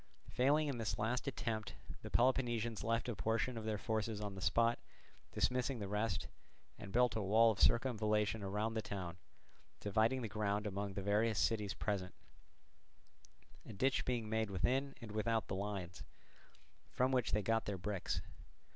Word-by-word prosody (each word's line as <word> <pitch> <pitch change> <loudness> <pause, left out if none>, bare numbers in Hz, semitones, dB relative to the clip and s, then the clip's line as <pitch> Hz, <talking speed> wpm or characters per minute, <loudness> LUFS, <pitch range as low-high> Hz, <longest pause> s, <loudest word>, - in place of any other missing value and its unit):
Failing 145 +4 +3
in 135 -4 -2
this 110 - -1
last 120 +6 -1
attempt 110 -5 -3 0.3
the - - -7
Peloponnesians 120 -3 +1
left 115 +2 0
a 120 - -2
portion 115 +4 0
of 110 -1 -5
their 110 -1 -1
forces 110 +1 -2
on 105 -1 -4
the 95 - -8
spot, 115 +4 +3 0.5
dismissing 125 +1 0
the 100 -3 -4
rest, 105 +3 -1 0.5
and 100 - -8
built 125 +1 +3
a 110 - 0
wall 110 +4 +5
of 105 - -5
circumvallation 110 -3 +2
round 105 +3 -1
the 110 - 0
town, 90 -5 -5 0.6
dividing 110 +5 +1
the - - -1
ground 105 0 -1
among 100 -1 -3
the 100 - -3
various 105 +2 +2
cities 105 -3 +1
present; 95 -4 -2 1.5
a 115 - -9
ditch 130 +7 +1
being 120 -3 -1
made 110 0 0
within 130 +9 0
and 115 -3 -7
without 110 +1 0
the 95 - -3
lines, 95 -3 -4 0.9
from 130 +1 +1
which 125 -3 +1
they 105 0 +1
got 115 +2 +1
their 100 -2 -2
bricks. 95 0 -2
110 Hz, 165 wpm, -37 LUFS, 105-120 Hz, 1.5 s, wall